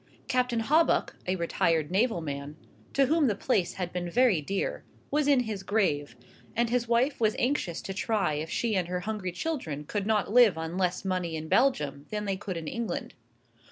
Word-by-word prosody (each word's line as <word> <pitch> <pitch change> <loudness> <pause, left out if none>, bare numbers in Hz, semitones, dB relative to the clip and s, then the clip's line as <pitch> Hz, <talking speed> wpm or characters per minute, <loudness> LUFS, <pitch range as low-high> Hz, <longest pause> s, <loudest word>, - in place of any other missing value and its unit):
Captain 250 -2 +1
Hawbuck, 310 +8 +2
a 185 - +1
retired 165 -2 0
naval 205 -1 +2
man, 145 -1 -5 0.4
to 275 - +4
whom 310 +1 +3
the 210 - +1
place 200 -5 0
had 180 -2 -4
been 175 -1 -3
very 230 -5 +3
dear, 195 +7 -2 0.3
was 295 0 +2
in 280 -3 +5
his 215 -5 -4
grave, 175 - 0 0.4
and 235 0 +1
his 245 -1 +1
wife 240 +4 +2
was 215 -1 +3
anxious 245 - -1
to 195 - -4
try 200 -5 0
if 155 +2 -3
she 225 +3 0
and 180 -3 0
her 180 0 -2
hungry 205 -2 -3
children 175 - -3
could 200 +6 -3
not 215 -1 +1
live 235 -8 +6
on 160 +1 -4
less 185 0 0
money 180 -3 -1
in 160 0 -5
Belgium 150 - +1
than 210 -1 -3
they 195 -1 0
could 190 -2 -5
in 160 -2 -6
England. 235 +4 -3
195 Hz, 195 wpm, -28 LUFS, 170-235 Hz, 0.4 s, live